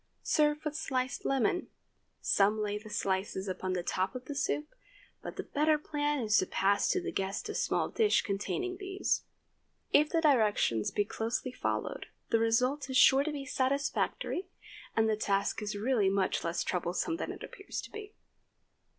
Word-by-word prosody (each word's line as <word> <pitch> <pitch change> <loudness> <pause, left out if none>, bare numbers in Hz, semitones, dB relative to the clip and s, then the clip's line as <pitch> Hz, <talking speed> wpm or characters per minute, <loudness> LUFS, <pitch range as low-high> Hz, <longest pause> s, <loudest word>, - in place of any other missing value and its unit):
Serve 300 0 +2
with 305 0 -2
sliced 260 -4 -2
lemon. 270 - +1 0.5
Some 205 +2 +3
lay 210 0 -1
the 215 0 -12
slices 190 -1 -1
upon 185 0 -2
the 180 -1 -1
top 185 +6 -1
of 255 0 -6
the 290 - -5
soup, 295 - -2 0.5
but - - -7
the - - -4
better 305 +1 +2
plan 295 0 -1
is 215 -1 +2
to 185 - 0
pass 200 +1 +2
to 375 - +2
the 360 - -4
guests 195 - -2
a - - -3
small - - 0
dish 435 -2 +2
containing 365 - -2
these. 385 0 -1 0.7
If 300 +1 +5
the 330 - +2
directions 215 - +3
be 205 - 0
closely 230 +4 -2
followed, - - -3 0.2
the 230 - +4
result 250 +5 +1
is 260 - +1
sure 270 +2 +7
to 310 - -2
be 285 -2 -5
satisfactory, 280 +7 -1 0.5
and 225 0 +3
the 220 - +2
task 200 0 0
is 210 0 -3
really 215 -2 +2
much 195 -1 +1
less 170 +1 -1
troublesome 180 - -1
than - - -3
it - - -9
appears 395 - -7
to - - -11
be. 425 0 -9
255 Hz, 175 wpm, -31 LUFS, 205-300 Hz, 0.7 s, sure